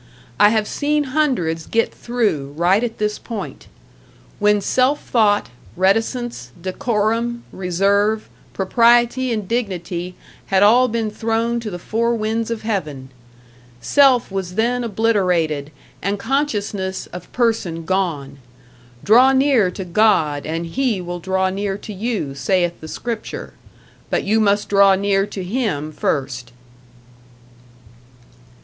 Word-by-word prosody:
I 205 - +7
have 215 -1 +1
seen 295 0 0
hundreds 180 - 0
get 230 0 0
through 200 - -2
right 185 +6 +3
at 235 -2 -3
this 210 0 -1
point. 225 -4 -7 0.7
When 210 0 +3
#self 260 +7 +1
thought, 210 - +2 0.3
reticence, 225 - 0
decorum, 225 +5 -1
reserve, 200 +4 +1 0.2
propriety 240 +5 +3
and 215 -4 -2
dignity# 180 -6 -3 0.3
had 195 0 +3
all 245 +5 +6
been 225 -2 -2
thrown 230 +2 -1
to 230 -2 -5
the 175 - -5
four 230 +6 -1
winds 220 +1 -2
of 230 -2 -4
heaven. 150 - -3 0.7
Self 260 - +3
was 190 -2 -4
then 240 +3 +1
obliterated 180 -10 0 0.3
and 200 +2 -1
consciousness 205 -6 -2
of 180 -1 -9
person 220 -9 -1
gone. 165 -7 -2 0.6
Draw 250 +6 +6
near 265 -7 +3
to 185 +1 -6
God 170 -7 +2
and 165 +2 -3
He 235 +3 -1
will 175 0 -5
draw 190 +1 0
near 195 0 -2
to 210 - -9
you 205 - -3
saith 175 +5 0
the 160 - -8
scripture, 230 +6 -5 0.6
but - - 0
you 215 +3 +2
must 205 -1 +2
draw 200 -1 +5
near 195 0 +1
to 195 -2 -6
Him 180 - -2
first. 130 -5 -3
205 Hz, 125 wpm, -20 LUFS, 180-230 Hz, 0.7 s, I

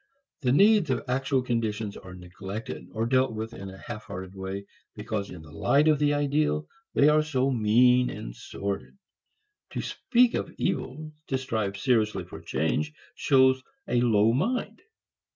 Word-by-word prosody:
The 125 -3 +2
needs 200 +2 +5
of 130 - 0
actual 130 +1 +1
conditions 110 -4 -2
are 95 -1 -10
neglected, 95 +4 -7
or 110 +1 -1
dealt 130 0 +2
with 110 +1 -5
in 100 -3 -7
a 95 - -10
half 110 +1 -8
hearted 95 -1 -7
way, 95 +1 -5 0.3
because 105 -1 -3
in 80 -3 -9
the 80 - -14
light 145 - +3
of 155 -2 +4
the 145 0 +3
ideal 145 - +1 0.3
they 140 - +6
are 150 0 +5
so 135 -3 0
mean 125 +2 +4
and - - -7
sordid. 100 - -5 0.8
To - - -2
speak 245 -1 +2
of - - -2
evils, 155 -4 -2 0.2
to 135 - 0
strive 110 -6 -2
seriously 110 -2 +1
for - - -10
change, 75 0 -1 0.2
shows 130 -1 +4 0.3
a 120 - +2
low 110 -2 +4
mind. 235 - -1
120 Hz, 160 wpm, -27 LUFS, 100-135 Hz, 0.8 s, they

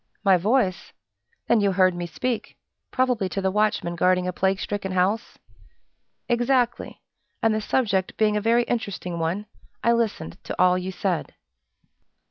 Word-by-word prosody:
"My 195 -2 +5
voice! 195 0 0 0.5
Then 235 -2 +4
you 200 -1 +2
heard 185 -1 +4
me 175 0 -4
speak, 235 +7 -4 0.3
probably 250 -7 0
to 195 - -3
the 190 -1 0
watchman 205 -4 0
guarding 180 +1 +2
a 180 - -2
plague 190 +1 0
stricken 200 -3 -3
house?" 190 +5 0 0.9
"Exactly! 240 0 0 0.4
and 225 -1 +4
the 215 - -1
subject 200 -6 0
being 215 -1 +2
a 210 - 0
very 230 +2 +3
interesting 200 -7 -3
one, 170 +6 -2 0.4
I 235 - +4
listened 225 - -2
to - - -6
all 180 0 +5
you 185 +1 -3
said." 185 -2 -2
200 Hz, 150 wpm, -24 LUFS, 185-230 Hz, 0.9 s, My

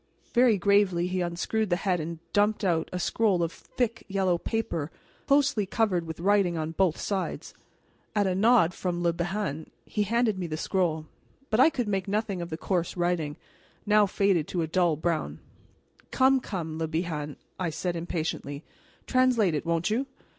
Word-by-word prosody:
Very 240 -3 +5
gravely 195 -2 +3
he 185 0 -1
unscrewed 180 +5 -1
the 175 - +3
head 180 -1 0
and 165 +2 -4 0.2
dumped 210 +1 +2
out 165 -4 +1
a 180 - -3
scroll 185 0 +1
of 165 - -1
thick 230 +3 -3
yellow 190 -3 +1
paper 170 -10 -2 0.4
closely 275 -7 +3
covered 185 -6 0
with 160 0 -6
writing 190 -2 +2
on 160 0 -2
both 175 -1 +1
sides. 195 -2 -3 0.6
At 205 -1 +3
a 190 - +1
nod 200 -3 +4
from 175 -1 -2
Le 170 -1 +2
Bihan 170 -3 -3 0.2
he 210 - -2
handed 220 -1 +1
me 175 - -2
the 155 -1 -4
scroll. 165 -3 0 0.5
But 220 - +2
I 260 - +8
could 245 -7 -2
make 195 -2 -1
nothing 200 -2 -1
of 170 - -5
the 160 - -4
coarse 175 0 -1
writing, 175 -4 0 0.5
now 210 0 +5
faded 190 -5 +1
to 175 -2 -1
a - - -2
dull 170 -1 +2
brown. 160 +1 -2 0.7
"Come, 265 0 +4
come, 165 -9 -5
Le 160 - -1
Bihan," 155 -3 -3 0.2
I 180 -2 0
said 175 +2 -3
impatiently, 160 -3 -3 0.4
"translate 250 -8 +3
it, 150 +2 -2
won't 170 +4 0
you? 255 +5 0
180 Hz, 175 wpm, -27 LUFS, 165-210 Hz, 0.7 s, I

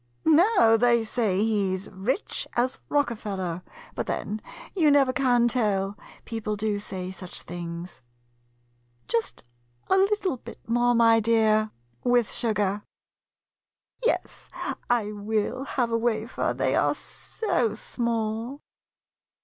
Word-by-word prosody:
No, 320 - +6
they 235 0 +4
say 215 -4 +1
he 200 -4 +1
's 190 - -8
rich 210 - -2
as 250 +2 0
Rockefeller; 200 - -1 0.3
but, - - -3
then, 215 +1 -3 0.3
you 320 -6 +4
never 275 -3 +4
can 245 -3 +3
tell 205 -5 0 0.2
— - - -22
people 220 -2 -3
do 205 0 -1
say 185 -2 -5
such 185 -1 -6
things. 170 -2 -7 1.1
Just 230 -1 -1 0.5
a 380 - +6
little 390 -6 +2
bit - - -12
more, 240 +1 +3
my 230 -1 +6
dear, 220 -1 +3 0.3
with 245 -2 +3
sugar. 210 -3 +1 1.2
Yes, - - -1 0.4
I 230 -4 +1
will 215 +5 -2
have 245 -4 -1
a 230 - +2
wafer, 225 0 0
they - - +1
are - - +2
so 235 - -2
small. 230 +4 -2
225 Hz, 120 wpm, -26 LUFS, 205-245 Hz, 1.2 s, No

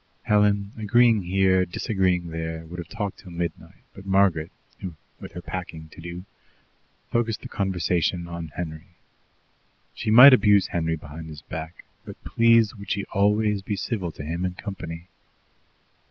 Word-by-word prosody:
Helen, 105 -1 +2
agreeing 115 0 +4
here, 95 0 +2
disagreeing 90 -1 0
there, 80 0 -5
would 90 +2 -8
have 85 - -6
talked 105 -1 -5
till 95 - -13
midnight, 85 0 -6
but 95 - -11
Margaret, 95 -5 +2 0.7
with - - -10
her 90 0 -8
packing 80 -2 -6
to 85 - -13
do, 85 +2 -7 0.9
focussed 115 -2 0
the - - -6
conversation 90 -2 -1
on 85 -1 -6
Henry. 85 +1 -7 1.0
She - - -4
might 125 +5 +10
abuse 105 -5 +5
Henry 80 -1 -1
behind 80 +1 -9
his 75 -2 -10
back, 80 +1 -8 0.2
but - - -9
please 115 -1 +4
would 100 -2 -10
she 100 -2 -1
always, 105 +1 +2
be 100 +2 -3
civil 95 -3 -3
to - - -8
him 85 +3 -3
in 90 -1 -2
company? 85 -4 -7
90 Hz, 150 wpm, -25 LUFS, 85-105 Hz, 1.0 s, might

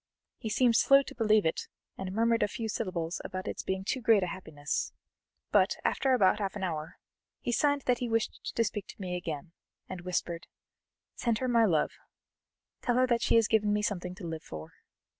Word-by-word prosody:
He 225 - -4
seemed 240 +1 +3
slow 275 0 +6
to - - -9
believe 215 -4 +3
it, 160 - -1 0.3
and 190 -1 -5
murmured 230 +3 +2
a - - +3
few 225 +2 -4
syllables 185 -6 -3
about 185 0 -5
its - - -3
being 190 0 -2
too 260 - -1
great 220 -4 +5
a - - +1
happiness; 155 -5 -3 0.6
but, - - +4
after 265 -1 +2
about 205 -2 +4
half 200 -1 -2
an 200 - -4
hour, 160 -3 -3 0.4
he 240 - -2
signed 285 +3 +2
that 250 -1 +2
he 245 - -2
wished 225 -1 -1
to 230 - +3
speak 210 -2 -3
to - - -12
me 180 -2 -3
again, 165 -2 -5 0.4
and 185 -1 -6
whispered: 175 -1 -3 0.7
"Send 235 -3 0
her 255 - -2
my 235 -2 +4
love: 160 -7 +2 0.9
tell 245 - +1
her 255 +1 +5
that 235 -2 +1
she - - +3
has 225 -2 +5
given 215 -2 +2
me 210 0 +1
something 180 -3 -2
to 180 - -8
live 160 -1 -4
for." 80 0 -9
205 Hz, 200 wpm, -30 LUFS, 180-230 Hz, 0.9 s, slow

